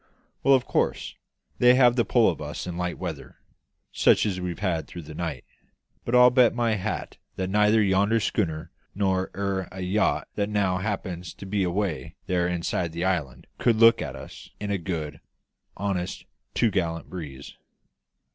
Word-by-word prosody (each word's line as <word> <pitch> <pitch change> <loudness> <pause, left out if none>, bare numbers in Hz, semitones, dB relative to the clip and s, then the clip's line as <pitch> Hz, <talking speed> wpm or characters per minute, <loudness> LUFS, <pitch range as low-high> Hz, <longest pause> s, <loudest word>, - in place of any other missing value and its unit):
Well, 135 - +6
of 130 - 0
course, - - -1 0.4
they 125 0 +7
have 125 -2 +5
the 120 - +3
pull 115 -1 +3
of 85 - -1
us 75 0 -5
in 90 -1 -5
light 90 0 -3
weather, 85 -5 -6 0.6
such - - +4
as 95 -3 -2
we've 90 -2 -3
had 90 -5 -1
through 85 - -8
the 75 +1 -10
night; 80 -5 -4 0.6
but 120 - 0
I'll 125 0 +8
bet 125 -2 +4
my 120 -2 +1
hat 95 -5 -3 0.2
that 95 0 -3
neither 105 +1 +4
yonder 100 +3 +3
schooner 80 -7 -2 0.2
nor 95 -2 0
e'er 100 -2 -2
a 95 +1 -7
yacht 95 +4 +1
that 100 0 -1
now 100 -3 +1
happens 95 -3 -4
to - - -10
be 100 +1 -1
away 90 -6 -2
there 90 -1 +1
inside 85 -1 -2
the 85 +2 -2
island 75 -9 -2
could 120 - +3
look 115 +1 +6
at 70 -4 -4
us 65 - -11
in 105 -1 -3
a 100 - 0
good, 80 -5 -4 0.6
honest 95 -2 -3 0.3
to'gallant 85 -7 0
breeze. 70 -7 -8
95 Hz, 170 wpm, -26 LUFS, 85-105 Hz, 0.6 s, I'll